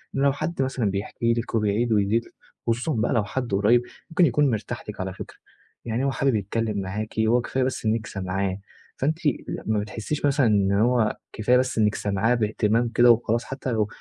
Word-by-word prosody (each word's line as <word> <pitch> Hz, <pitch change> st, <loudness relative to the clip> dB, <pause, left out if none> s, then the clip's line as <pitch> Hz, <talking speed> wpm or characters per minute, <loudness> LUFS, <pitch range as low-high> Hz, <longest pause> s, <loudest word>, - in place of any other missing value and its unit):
إن 135 Hz, -, 0 dB
لو 140 Hz, 0 st, +4 dB
حد 155 Hz, +1 st, -3 dB
مثلًا 130 Hz, -6 st, 0 dB
بيحكِ 100 Hz, +2 st, -4 dB
لِك 115 Hz, 0 st, +1 dB
وبيعيد 110 Hz, +2 st, +1 dB
ويزيد 105 Hz, +2 st, +2 dB, 0.4 s
خصوصًا 120 Hz, +7 st, 0 dB
بقى 110 Hz, +3 st, 0 dB
لو 115 Hz, -4 st, +2 dB
حد 120 Hz, +3 st, -4 dB
قُريّب 105 Hz, +5 st, +4 dB, 0.3 s
ممكن 170 Hz, +1 st, +4 dB
يكون 145 Hz, +1 st, +3 dB
مرتاح 115 Hz, +2 st, -4 dB
لِك 105 Hz, -, -7 dB
على 95 Hz, 0 st, -4 dB
فكرة، -, -, -10 dB, 0.5 s
يعني 115 Hz, +2 st, -1 dB
هو 135 Hz, -, +1 dB
حابب 135 Hz, -2 st, +1 dB
يتكلم 105 Hz, 0 st, -1 dB
معاكِ 105 Hz, +4 st, -4 dB
هو 115 Hz, +3 st, +3 dB
كفاية 130 Hz, +2 st, -1 dB
بس 130 Hz, -2 st, -2 dB
إنك 110 Hz, 0 st, 0 dB
سامعاه، 95 Hz, 0 st, -2 dB, 0.4 s
فأنتِ 155 Hz, +4 st, 0 dB, 0.5 s
ما 110 Hz, -1 st, +1 dB
بتحسيش 110 Hz, +8 st, -3 dB
مثلًا 140 Hz, -1 st, +3 dB
إن 100 Hz, -2 st, +3 dB
هو 110 Hz, +2 st, +2 dB, 0.2 s
كفاية 120 Hz, +4 st, +3 dB
بس 130 Hz, -1 st, 0 dB
إنك 105 Hz, -1 st, +3 dB
سمعاه 105 Hz, +4 st, +1 dB
بإهتمام 110 Hz, +1 st, +1 dB
كده 120 Hz, +1 st, +6 dB
وخلاص 115 Hz, 0 st, +1 dB
حتى 135 Hz, -1 st, -4 dB
لو 110 Hz, -3 st, +1 dB
115 Hz, 190 wpm, -24 LUFS, 105-125 Hz, 0.5 s, كده